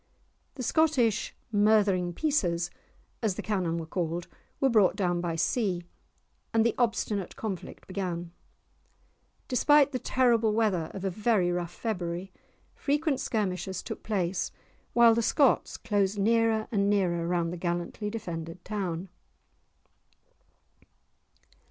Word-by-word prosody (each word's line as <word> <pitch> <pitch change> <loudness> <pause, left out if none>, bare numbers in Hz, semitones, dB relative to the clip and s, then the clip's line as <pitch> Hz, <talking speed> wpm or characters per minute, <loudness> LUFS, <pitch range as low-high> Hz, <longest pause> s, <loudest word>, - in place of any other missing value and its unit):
The 255 - -5
Scottish 250 -7 +2 0.2
"murthering 205 -4 +3
pieces," 175 - 0 0.5
as 215 -5 0
the - - -5
cannon 185 -6 -1
were 165 - -4
called, 170 +1 -3 0.3
were 270 - +4
brought 215 -7 +4
down 175 -4 0
by 170 -2 -2
sea, 180 +1 0 0.7
and 225 0 +4
the 235 - +3
obstinate 215 -5 0
conflict 200 -5 -6
began. 175 -3 -4 1.2
Despite 285 +2 +4
the 255 - -2
terrible 235 -4 +2
weather 205 -8 +1
of 195 0 -5
a 190 - 0
very 205 -2 +2
rough 175 -1 -2
February, 180 -4 -3 0.4
frequent 295 -1 0
skirmishes 190 -4 -2
took - - -6
place, 185 -4 -1 0.4
while 235 -1 +7
the 230 - +1
Scots 275 +3 +2
closed 205 -2 0
nearer 225 +1 +2
and 200 -2 +2
nearer 175 -4 +1
round 170 -1 0
the - - -5
gallantly 175 +4 -3
defended 170 -6 -6
town. 190 -4 -3
200 Hz, 120 wpm, -28 LUFS, 175-225 Hz, 1.2 s, while